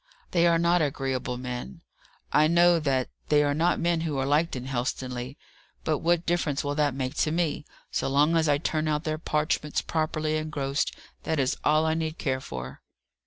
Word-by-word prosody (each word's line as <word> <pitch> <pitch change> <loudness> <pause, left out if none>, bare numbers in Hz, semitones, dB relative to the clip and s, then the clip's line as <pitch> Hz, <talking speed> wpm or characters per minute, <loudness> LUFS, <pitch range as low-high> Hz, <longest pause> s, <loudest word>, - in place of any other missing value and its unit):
"They 170 -1 +4
are 170 -1 +4
not 170 +1 +3
agreeable 135 -4 -2
men; 125 - -6 0.5
I 150 +1 +5
know 170 +1 +5
that; 135 -4 0 0.2
they 150 -1 +5
are 145 0 +1
not 165 +4 +2
men 170 -1 +1
who 155 -4 -2
are 135 - 0
liked 150 +4 +2
in 125 0 -5
Helstonleigh, 125 0 -3 0.5
but 155 -2 0
what 170 +1 +1
difference 165 -5 0
will 145 0 -1
that 145 -2 +1
make 130 -1 -2
to - - +2
me? 160 -3 -1 0.3
So - - -1
long 145 +4 +3
as 160 -2 +3
I 145 - +4
turn 155 +1 -1
out 150 0 0
their 155 -1 -2
parchments 150 -1 -1
properly 155 -1 -1
engrossed, 145 -3 -2 0.3
that 160 - -1
is 130 -1 +1
all 155 +1 +3
I 160 - +2
need 160 0 -2
care 130 -3 -1
for." 65 - -7
150 Hz, 190 wpm, -27 LUFS, 135-160 Hz, 0.5 s, I